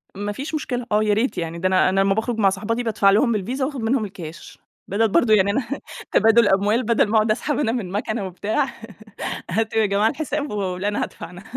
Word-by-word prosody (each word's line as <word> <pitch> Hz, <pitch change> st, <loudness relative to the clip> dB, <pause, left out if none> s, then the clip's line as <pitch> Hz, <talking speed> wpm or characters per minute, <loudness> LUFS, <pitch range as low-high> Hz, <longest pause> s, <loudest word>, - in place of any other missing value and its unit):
ما 205 Hz, +1 st, -3 dB
فيش 275 Hz, +9 st, -5 dB
مشكلة، 250 Hz, -5 st, -3 dB
آه، 210 Hz, +1 st, +3 dB
يا 210 Hz, -1 st, +2 dB
ريت 225 Hz, +6 st, 0 dB
يعني 165 Hz, 0 st, -4 dB
ده 185 Hz, -, +1 dB
أنا 185 Hz, 0 st, +3 dB
أنا 195 Hz, +1 st, +1 dB
لمّا 195 Hz, 0 st, +3 dB
باخرج 225 Hz, +2 st, -2 dB
مع 195 Hz, -2 st, +5 dB
صاحباتي 220 Hz, +5 st, -2 dB
بادفع 210 Hz, -3 st, +2 dB
لهم 225 Hz, +5 st, +3 dB
بالVisa 250 Hz, +8 st, -4 dB
وآخد 270 Hz, -1 st, -2 dB
منهم 225 Hz, 0 st, +1 dB
الكاش، 170 Hz, -5 st, -10 dB, 0.3 s
بدل 220 Hz, +4 st, +2 dB
برضه 215 Hz, +3 st, +3 dB
يعني 200 Hz, -1 st, +4 dB
أنا 270 Hz, -, 0 dB, 0.5 s
تبادل 225 Hz, +2 st, +5 dB
أموال 205 Hz, +5 st, +2 dB
بدل 230 Hz, -1 st, +2 dB
ما 215 Hz, -, -1 dB
أقعد 215 Hz, 0 st, +3 dB
أسحب 285 Hz, +7 st, -1 dB
أنا 275 Hz, -6 st, +1 dB
من 225 Hz, -7 st, -3 dB
مكنة 210 Hz, +1 st, -2 dB
وبتاع، 205 Hz, +7 st, -1 dB, 0.8 s
هاتوا 220 Hz, +3 st, 0 dB
يا -, -, +3 dB
جماعة 205 Hz, +2 st, +2 dB
الحساب 295 Hz, +1 st, -3 dB
ولا، 195 Hz, -1 st, -2 dB
أنا 205 Hz, -, -1 dB
هادفع -, -, -8 dB
أنا. 180 Hz, +1 st, -12 dB
215 Hz, 220 wpm, -22 LUFS, 195-235 Hz, 0.8 s, مع